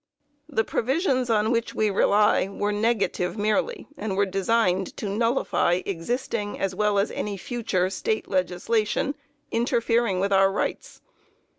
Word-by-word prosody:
The 220 -7 +1
provisions 260 - 0
on 220 0 +2
which 230 -1 -1
we 215 -1 +1
rely 205 0 +3
were 205 +1 -2
negative 210 -3 0
merely, 215 - 0
and 205 -2 -4
were 200 - +3
designed 195 -1 0
to 210 - -4
nullify 210 -4 +1
existing 205 +3 -3
as 195 -1 -1
well 210 +1 +1
as 200 +2 +1
any 205 -1 -3
future 215 -5 -1
State 215 +3 -2
legislation 200 +8 0 0.4
interfering 230 -3 +1
with 200 +1 +1
our 195 0 +5
rights. - - -3
210 Hz, 135 wpm, -25 LUFS, 195-230 Hz, 0.4 s, our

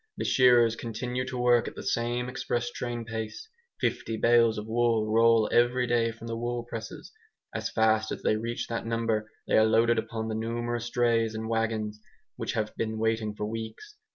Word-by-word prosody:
The - - -3
shearers 120 -3 +5
continue 125 +3 -3
to 130 - -4
work 120 -1 +3
at - - -7
the - - -7
same 120 +1 -1
express 120 -2 -2
train 120 -1 -4
pace; 110 - -5 0.3
fifty 115 - -1
bales 115 -1 +4
of 105 - -4
wool 115 -1 +1
roll 115 0 +4
every 120 +1 +3
day 115 -1 +1
from 115 0 -12
the 115 0 -3
wool 120 +1 -3
presses; 115 -2 -8 0.4
as - - -2
fast 110 -1 +2
as - - -5
they - - +3
reach 115 +2 -3
that 115 - -3
number 115 -2 -1 0.2
they - - +4
are - - +6
loaded 115 +1 +3
upon 110 0 -4
the 110 - -3
numerous 120 +1 -2
drays 115 -3 +1
and 110 0 -4
wagons 110 -2 -1 0.3
which - - -3
have 110 0 -2
been 110 -1 -2
waiting 110 -1 0
for 105 - -3
weeks. 115 - -6
115 Hz, 185 wpm, -28 LUFS, 110-120 Hz, 0.4 s, are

